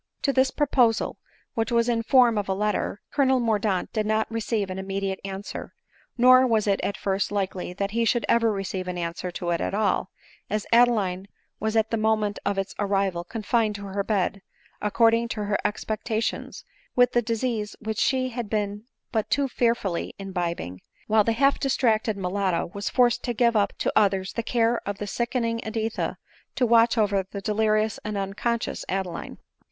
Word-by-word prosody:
To 275 - +2
this 260 0 +3
proposal, 255 -6 +1 0.3
which 225 0 -1
was 235 0 +3
in 235 -1 +1
form 240 -1 +5
of 200 - -4
a 190 - +1
letter, 210 0 -1
Colonel 265 -3 +3
Mordaunt 210 -5 0
did 215 -1 0
not 215 0 +2
receive 220 -3 -1
an 185 - -4
immediate 195 0 -3
answer; 195 +1 -6 0.4
nor 255 +1 +7
was 220 -3 +2
it 200 -2 +1
at 200 - -2
first 195 +1 -1
likely 190 -3 -2
that 200 +2 -2
he 230 +2 +1
should 235 +1 +1
ever 230 -1 +3
receive 195 -2 -3
an 180 -1 -3
answer 170 +1 -3
to 175 0 -3
it 170 - 0
at - - -1
all, 200 -3 +1 0.4
as 210 0 -1
Adeline 210 -6 +3 0.3
was 220 +1 -1
at 220 0 +2
the 230 - +1
moment 215 -1 +1
of 200 -1 0
its 195 0 -2
arrival 195 -3 0
confined 220 +2 0
to 200 0 -7
her 200 +1 -2
bed, 200 -1 0 0.4
according 230 +2 +3
to 220 -2 -3
her 205 0 0
expectations, 220 +2 -3 0.3
with 245 0 +5
the 240 - +3
dis 230 0 -2
ease 220 -5 -2
which 220 -1 -4
she 255 -1 +2
had 235 -3 -5
been 210 0 -2 0.3
but 220 -3 -1
too 280 0 +2
fearfully 230 -8 -1
imbibing; 170 - -4 0.2
while 215 0 +4
the 230 - +1
half 275 +4 +3
distracted 225 -6 +1
mulatto 185 -2 -1
was 200 -1 -3
forced 245 -2 +3
to 240 -2 -2
give 235 0 +3
up 205 -2 +3
to - - -1
others 195 -3 +2
the 230 - -1
care 230 0 +1
of 200 0 -4
the 205 - -4
sickening 230 +1 -1
Editha, 220 0 -2 0.4
to 250 - +2
watch 230 0 +4
over 200 -3 +2
the 200 - -5
delirious 215 +1 +1
and 210 -1 -3
unconscious 205 +4 -2
Adeline. 185 -3 -3
215 Hz, 180 wpm, -25 LUFS, 195-230 Hz, 0.4 s, nor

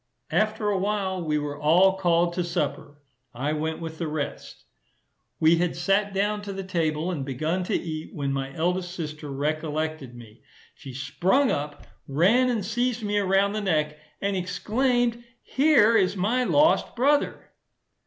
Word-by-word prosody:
After 215 +4 +1
a 195 - 0
while, 190 -2 -1
we 155 -2 0
were 145 0 -4
all 180 +5 +5
called 175 -2 +2
to 180 0 -1
supper. 145 -3 -4 0.3
I 140 +5 -1
went 160 +1 -2
with 160 -1 -7
the 165 - -2
rest. 150 -2 -5 0.8
We 160 +1 +5
had 175 0 0
sat 195 +4 +1
down 205 +2 0
to 200 -1 -6
the 195 0 -5
table 165 -2 -1
and 150 -6 -3
begun 155 +7 -2
to - - -1
eat, 155 -2 -4
when 140 -2 -2
my 135 0 -3
eldest 180 +2 -1
sister 150 -3 -6
recollected 155 -1 -3
me: 115 -3 -14 0.3
she 135 - -11
sprung 185 - +1
up, 145 +1 -4 0.2
ran 200 - +3
and 225 -6 -1
seized 240 +2 -1
me 205 0 0
around 195 +1 +2
the 215 - -2
neck, 150 -5 0 0.2
and 200 0 -1
exclaimed, 235 +6 0 0.2
"Here 260 -6 +4
is 195 -2 +2
my 235 +7 +1
lost 305 +6 +3
brother." 285 +4 +1
180 Hz, 160 wpm, -25 LUFS, 155-205 Hz, 0.8 s, all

